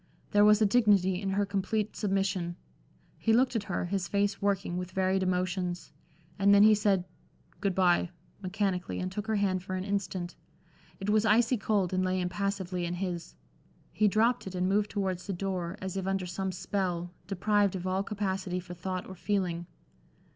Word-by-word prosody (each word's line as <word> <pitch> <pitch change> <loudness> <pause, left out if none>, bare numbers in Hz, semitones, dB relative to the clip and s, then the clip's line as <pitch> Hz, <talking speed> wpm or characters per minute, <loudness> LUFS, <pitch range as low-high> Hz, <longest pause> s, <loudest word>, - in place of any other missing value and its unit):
There 205 0 +5
was 210 +1 +6
a - - +5
dignity 200 -4 +3
in 195 - -2
her 200 +1 +1
complete 200 +2 -1
submission. 195 -4 -1 0.6
He 225 - +2
looked 250 +1 +3
at 210 -3 -1
her, 180 - -2
his 185 0 -2
face 200 0 0
working 195 -3 0
with 180 0 -3
varied 190 0 +1
emotions; 180 -2 -1 0.5
and 200 0 +5
then 200 - +7
he 215 0 +8
said 200 -3 +2 0.6
"Good 195 -3 0
bye" 180 -2 +3 0.3
mechanically 190 -1 -1
and 185 0 -3
took 210 +3 -5
her 220 - +1
hand 190 -3 +1
for 185 +1 -5
an 185 - -2
instant. 190 -3 -3 0.6
It 200 +1 -1
was 215 0 +4
icy 230 +3 +4
cold 200 -4 0
and 185 0 +1
lay 185 0 0
impassively 185 0 -2
in 175 +1 -2
his. 175 -2 -4 0.6
He 215 - +3
dropped 225 +3 +2
it 190 - -6
and 180 0 +1
moved 205 +2 +2
towards 190 -3 -2
the 200 - -2
door, 185 0 -3
as 190 -1 -4
if 190 -1 -2
under 195 -1 0
some 190 +2 -3
spell, 180 -1 -2 0.2
deprived 200 0 +2
of 185 -1 -5
all 185 +1 0
capacity 195 -3 -2
for 180 0 -8
thought 185 +1 -4
or 190 - -8
feeling. 180 -4 -1
190 Hz, 185 wpm, -30 LUFS, 180-205 Hz, 0.6 s, he